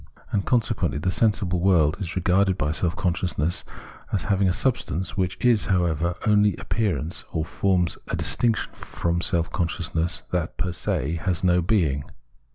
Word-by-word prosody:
And, 100 - -1
conse 120 -4 +2
quently, 70 - -1
the 90 +4 0
sensible 100 -4 +1
world 85 -5 +3
is 95 -4 -4
regarded 95 +1 +2
by 75 -3 0
self 85 +1 -1
con 90 -2 +1
sciousness 85 -1 -1 0.5
as 100 - 0
having 100 -2 +2
a - - +2
subsistence 95 - -1
which 95 -1 -1
is, 120 -4 +3
however, 85 -2 +1
only 105 -1 +4
appearance, 85 - -1
or 80 -2 -1
forms 90 0 0
a - - -2
distinction 115 -2 0
from 85 0 -2
self 85 -2 +1
consciousness 85 -3 0
that 90 -2 -2
per 90 -1 -2
se 80 -1 -1
has 90 0 -1
no 90 -1 +4
being. 80 -7 +1
90 Hz, 165 wpm, -24 LUFS, 85-100 Hz, 0.5 s, only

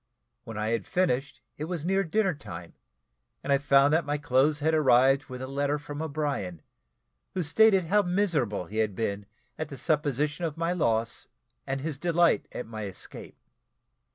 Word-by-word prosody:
When 115 -3 -7
I 105 +1 -1
had 115 -3 -1
finished 145 -7 0 0.2
it 155 - -2
was 165 -2 -4
near 195 +2 +2
dinner 195 +2 +1
time, 90 - -9 0.7
and 140 - +1
I 140 - +3
found 140 0 +4
that 165 +1 +3
my 145 0 -1
clothes 145 +1 +2
had 160 +2 +1
arrived 135 -1 +4
with 130 -1 -7
a - - -4
letter 140 +2 0
from 145 0 -7
O'Brien, 140 - -3 0.7
who 185 - 0
stated 195 +3 +4
how 205 +5 +3
miserable 170 - 0
he 105 +6 -8
had 110 -3 +1
been 100 -2 -3 0.3
at 155 -1 -3
the 140 - -8
supposition 150 +2 0
of 160 -2 -2
my 165 +1 0
loss, 115 -9 -1 0.4
and 135 0 -2
his 150 -2 -4
delight 170 0 +2
at - - -5
my 110 -2 -6
escape. 95 -2 -9
145 Hz, 175 wpm, -28 LUFS, 125-160 Hz, 0.7 s, found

